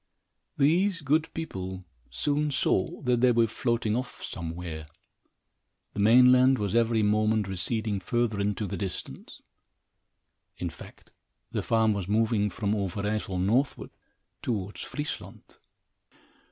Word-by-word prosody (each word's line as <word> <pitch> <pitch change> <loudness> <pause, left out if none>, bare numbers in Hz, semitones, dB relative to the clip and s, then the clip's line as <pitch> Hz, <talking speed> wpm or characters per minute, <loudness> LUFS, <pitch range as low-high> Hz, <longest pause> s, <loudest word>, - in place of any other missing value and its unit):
These 175 +6 +3
good 155 +3 +1
people 95 - -5 0.2
soon 150 +1 0
saw 140 +1 0
that 125 -2 +2
they 125 -1 +5
were 115 -1 +4
floating 115 -1 -1
off 125 +1 -5
somewhere. 80 -2 -6 1.1
The - - -6
mainland 125 +4 +6
was 105 -3 -2
every 115 -1 +3
moment 110 0 +2
receding 100 +3 -2
further 110 +2 0
into 105 +1 -1
the 95 - -4
distance. 95 -5 -7 1.1
In 90 -2 -3
fact, 80 - -14 0.4
the - - -1
farm 110 -1 +2
was 100 -3 -3
moving 105 0 +2
from 105 -1 -1
Overijssel 100 0 -2
northward, 115 +9 0 0.5
towards 105 -4 -3
Friesland. 150 0 -7
110 Hz, 115 wpm, -28 LUFS, 100-125 Hz, 1.1 s, mainland